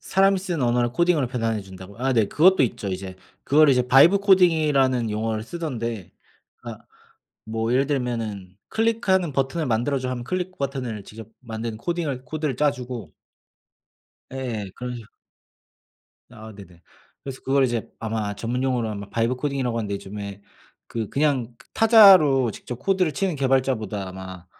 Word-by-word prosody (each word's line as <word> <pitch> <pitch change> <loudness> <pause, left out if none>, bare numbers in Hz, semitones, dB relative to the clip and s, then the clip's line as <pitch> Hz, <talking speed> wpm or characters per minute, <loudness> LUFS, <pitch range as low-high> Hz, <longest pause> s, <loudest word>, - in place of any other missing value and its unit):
사람이 195 0 +2
쓴 175 -6 -3
언어를 120 0 +1
코딩으로 170 -1 +2
변환해 115 -4 -2
준다고요. 95 +2 -12
아 130 +2 0
네 115 -4 +3
그것도 185 0 +4
있죠. 110 -4 -2
이제 95 0 -5 0.3
그걸 150 +2 +4
이제 125 -2 +3
vibe 135 +10 +6
coding이라는 150 - +3
용어를 110 +1 -2
쓰던데 115 - -5 0.5
그러니까 - - -10 0.6
뭐 115 +1 -2
예를 135 +2 +2
들면은 115 -9 -3
"클릭하는 220 -7 +1
버튼을 135 +4 -1
만들어 120 +4 0
줘." 130 0 -4
하면 125 -1 -4
클릭 185 +7 -4
버튼을 130 -6 -4
직접 110 +2 -11
만든 115 -2 -5
코딩을 150 -4 -3
코드를 155 +1 -3
짜 150 +1 +3
주고 125 - -8 1.2
예예. 120 -7 -4
그런식 125 -3 -7 1.2
아 110 -2 -11
네네. 90 -4 -15 0.4
그래서 135 -1 -8
그걸 135 0 +3
이제 120 -3 -2
아마 110 -2 -3
전문용어로는 120 -1 -2
아마 100 0 -8
vibe 115 +2 0
coding이라고 135 -5 -1
하는데 105 -3 -3
요즘에 100 0 -7 0.5
그 115 -3 -4
그냥 135 -5 0
그 - - -20
타자로 190 - +6
직접 125 +3 -8
코드를 185 +1 0
치는 190 -5 -1
개발자보다 130 -7 0
아마 95 -1 -9
125 Hz, 380 characters per minute, -23 LUFS, 110-145 Hz, 1.2 s, vibe